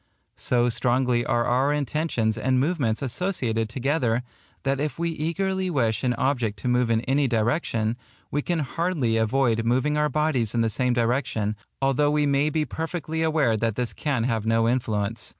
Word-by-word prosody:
So 120 Hz, -1 st, +1 dB
strongly 120 Hz, +1 st, +1 dB
are 120 Hz, 0 st, +1 dB
our 130 Hz, +4 st, +2 dB
intentions 145 Hz, -6 st, 0 dB
and 130 Hz, +3 st, +1 dB
movements 135 Hz, -6 st, 0 dB
associated 120 Hz, -, -1 dB
together, 125 Hz, -2 st, 0 dB, 0.4 s
that 135 Hz, 0 st, 0 dB
if 150 Hz, +1 st, -2 dB
we 170 Hz, 0 st, -1 dB
eagerly 185 Hz, +4 st, -1 dB
wish 120 Hz, -9 st, 0 dB
an 125 Hz, -1 st, +1 dB
object 120 Hz, -5 st, 0 dB
to -, -, -3 dB
move 125 Hz, -1 st, +2 dB
in 115 Hz, -1 st, +2 dB
any 135 Hz, +3 st, +1 dB
direction, 115 Hz, -1 st, 0 dB, 0.3 s
we 145 Hz, -, 0 dB
can 175 Hz, +3 st, -1 dB
hardly 150 Hz, -6 st, 0 dB
avoid 115 Hz, 0 st, +1 dB
moving 130 Hz, +6 st, +1 dB
our 150 Hz, 0 st, +2 dB
bodies 145 Hz, -8 st, 0 dB
in 115 Hz, -, +2 dB
the 115 Hz, -1 st, +1 dB
same 125 Hz, +3 st, +1 dB
direction, 120 Hz, -3 st, 0 dB, 0.3 s
although 135 Hz, +2 st, +3 dB
we 150 Hz, 0 st, +2 dB
may 140 Hz, +1 st, +2 dB
be 155 Hz, 0 st, 0 dB
perfectly 160 Hz, 0 st, -4 dB
aware 155 Hz, -8 st, +2 dB
that 115 Hz, -1 st, -1 dB
this 120 Hz, -3 st, -2 dB
can 135 Hz, -1 st, -1 dB
have 115 Hz, -3 st, 0 dB
no 115 Hz, 0 st, +2 dB
influence. 110 Hz, -3 st, -1 dB
125 Hz, 170 wpm, -25 LUFS, 115-150 Hz, 0.4 s, although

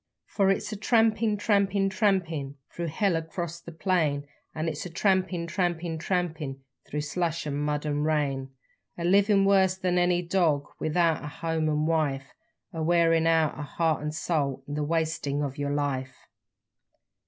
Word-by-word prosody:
_For 195 Hz, -2 st, +4 dB
it's 215 Hz, +2 st, -2 dB
trampin', 220 Hz, -1 st, +2 dB
trampin', 200 Hz, -1 st, +2 dB
tra 195 Hz, +2 st, +3 dB
a -, -, +4 dB
mpin' 160 Hz, -7 st, -3 dB, 0.2 s
thro' 170 Hz, 0 st, -4 dB
hell 180 Hz, +3 st, +1 dB
across 170 Hz, +1 st, -4 dB
the 170 Hz, -, -10 dB
plain, 155 Hz, -4 st, 0 dB, 0.3 s
And 160 Hz, +1 st, -2 dB
it's 160 Hz, +3 st, -4 dB
trampin' 185 Hz, -1 st, +1 dB
trampin' 170 Hz, -2 st, -2 dB
tra 180 Hz, +3 st, +1 dB
a -, -, -2 dB
mpin' 150 Hz, -5 st, -6 dB, 0.3 s
thro' 150 Hz, -, -2 dB
slush 165 Hz, +2 st, -2 dB
'n 145 Hz, -2 st, -2 dB
mud 150 Hz, 0 st, -1 dB
'n 145 Hz, -1 st, -1 dB
rain 145 Hz, -3 st, 0 dB, 0.5 s
A 170 Hz, -, -4 dB
livin' 195 Hz, +2 st, +4 dB
worse 190 Hz, -1 st, +4 dB
than 180 Hz, -1 st, +1 dB
any 175 Hz, 0 st, +2 dB
dog 170 Hz, -5 st, +1 dB
without 165 Hz, 0 st, +1 dB
a -, -, -5 dB
home 160 Hz, +1 st, -2 dB
'n 150 Hz, 0 st, +1 dB
wife, 145 Hz, -4 st, 0 dB, 0.4 s
A 165 Hz, -, -4 dB
wearin' 165 Hz, 0 st, +3 dB
out 160 Hz, -2 st, +3 dB
yer -, -, -6 dB
heart 155 Hz, +1 st, 0 dB
'n 150 Hz, 0 st, -2 dB
soul 150 Hz, -4 st, -1 dB
in 145 Hz, -, -5 dB
the 150 Hz, 0 st, -1 dB
wastin' 155 Hz, -2 st, -1 dB
of 140 Hz, 0 st, -4 dB
yer 145 Hz, 0 st, -1 dB
life. 135 Hz, -3 st, -3 dB
165 Hz, 170 wpm, -27 LUFS, 150-180 Hz, 0.5 s, For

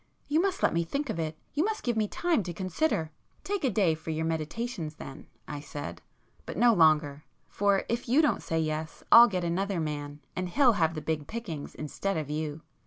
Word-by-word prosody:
You 310 Hz, +3 st, +3 dB
must 385 Hz, 0 st, -1 dB
let -, -, +4 dB
me 170 Hz, 0 st, +1 dB
think 280 Hz, -, -2 dB
of 170 Hz, -, -4 dB
it—you 160 Hz, -, -3 dB
must 435 Hz, +2 st, -2 dB
give 240 Hz, -2 st, 0 dB
me 215 Hz, -1 st, +1 dB
time 340 Hz, +3 st, +1 dB
to 175 Hz, -2 st, -5 dB
consider——" 185 Hz, -, -1 dB, 0.3 s
"Take 400 Hz, -3 st, -2 dB
a 265 Hz, -, +3 dB
day 190 Hz, -6 st, +3 dB
for 160 Hz, +1 st, -8 dB
your 160 Hz, 0 st, -1 dB
meditations 160 Hz, +1 st, -3 dB
then," 135 Hz, -2 st, -10 dB, 0.2 s
I 145 Hz, -1 st, -5 dB
said—"But 145 Hz, +2 st, -9 dB
no 235 Hz, +2 st, +6 dB
longer. 155 Hz, -4 st, +3 dB, 0.2 s
For 200 Hz, -1 st, +2 dB
if 235 Hz, 0 st, -2 dB
you 265 Hz, +5 st, +5 dB
don't 305 Hz, -2 st, +3 dB
say 165 Hz, -, -1 dB
yes, 155 Hz, 0 st, -3 dB
I'll 235 Hz, +1 st, +10 dB
get 185 Hz, -5 st, -2 dB
another 185 Hz, +2 st, -1 dB
man, 145 Hz, -2 st, -4 dB
and 185 Hz, -1 st, -2 dB
he'll 255 Hz, +3 st, +5 dB
have 165 Hz, -4 st, +1 dB
the 155 Hz, -, -4 dB
big 155 Hz, -2 st, -2 dB
pickings 200 Hz, -11 st, -6 dB
instead 190 Hz, +6 st, -3 dB
of 150 Hz, -2 st, -3 dB
you! 155 Hz, 0 st, -3 dB
170 Hz, 200 wpm, -29 LUFS, 155-235 Hz, 0.3 s, I'll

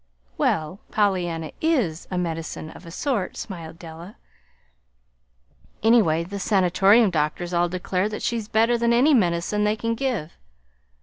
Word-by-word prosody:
"Well, 155 Hz, -, 0 dB
Pollyanna 175 Hz, -6 st, 0 dB
IS 245 Hz, -, 0 dB
a 185 Hz, -, -3 dB
medicine 165 Hz, -2 st, -4 dB
of 170 Hz, -, -13 dB
a -, -, -7 dB
sort," 210 Hz, -, -2 dB
smiled 165 Hz, -5 st, -7 dB
Della. 170 Hz, +4 st, -10 dB, 1.7 s
"Anyway, 205 Hz, -8 st, +4 dB
the 200 Hz, +4 st, -6 dB
Sanatorium 195 Hz, +2 st, +4 dB
doctors 170 Hz, +2 st, -1 dB
all 175 Hz, 0 st, +2 dB
declare 185 Hz, +2 st, -1 dB
that 215 Hz, -, -6 dB
she's 230 Hz, -3 st, -2 dB
better 225 Hz, +2 st, +2 dB
than 235 Hz, 0 st, +2 dB
any 270 Hz, +6 st, +4 dB
medicine 190 Hz, -1 st, +1 dB
they 210 Hz, +1 st, +2 dB
can 230 Hz, +1 st, -2 dB
give. 230 Hz, -, -2 dB
190 Hz, 135 wpm, -24 LUFS, 170-225 Hz, 1.7 s, Anyway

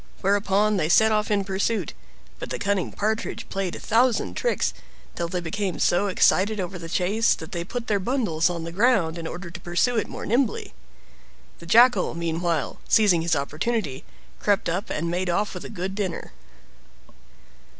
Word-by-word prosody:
Whereupon 205 Hz, +1 st, +2 dB
they 155 Hz, -4 st, 0 dB
set 220 Hz, +5 st, +5 dB
off 210 Hz, -1 st, +1 dB
in 205 Hz, -2 st, +1 dB
pursuit, 195 Hz, +3 st, -1 dB, 0.5 s
but -, -, -6 dB
the -, -, -3 dB
cunning 200 Hz, -4 st, -1 dB
Partridge 220 Hz, +2 st, -2 dB
played 195 Hz, -2 st, -3 dB
a -, -, -7 dB
thousand 240 Hz, +2 st, +2 dB
tricks, 485 Hz, -, 0 dB, 0.4 s
till 170 Hz, -, -2 dB
they 180 Hz, +1 st, -3 dB
became 185 Hz, +2 st, -3 dB
so 180 Hz, +4 st, +2 dB
excited 200 Hz, +2 st, +3 dB
over 180 Hz, 0 st, -4 dB
the 165 Hz, 0 st, -8 dB
chase 200 Hz, +6 st, +2 dB
that 160 Hz, -, -10 dB
they 170 Hz, -2 st, -3 dB
put 235 Hz, +6 st, -5 dB
their 205 Hz, -3 st, +1 dB
bundles 190 Hz, -, 0 dB
on 170 Hz, -2 st, -4 dB
the 165 Hz, -, -5 dB
ground 185 Hz, -5 st, +2 dB
in 165 Hz, -, -5 dB
order 175 Hz, 0 st, -7 dB
to 170 Hz, -, -8 dB
pursue 175 Hz, +8 st, 0 dB
it 220 Hz, -, 0 dB
more -, -, -6 dB
nimbly. 240 Hz, 0 st, 0 dB, 0.9 s
The 170 Hz, -, -12 dB
Jackal, 240 Hz, 0 st, +5 dB
meanwhile, 170 Hz, 0 st, -2 dB
seizing 200 Hz, -7 st, +4 dB
his 165 Hz, 0 st, +1 dB
opportunity, 155 Hz, -, -2 dB, 0.4 s
crept 205 Hz, -1 st, +1 dB
up, 185 Hz, +6 st, -2 dB
and 170 Hz, +2 st, -2 dB
made 180 Hz, +1 st, -1 dB
off 200 Hz, +4 st, 0 dB
with 180 Hz, -, -7 dB
a -, -, -7 dB
good 185 Hz, +2 st, -4 dB
dinner. 195 Hz, -4 st, -4 dB
190 Hz, 175 wpm, -24 LUFS, 170-215 Hz, 0.9 s, set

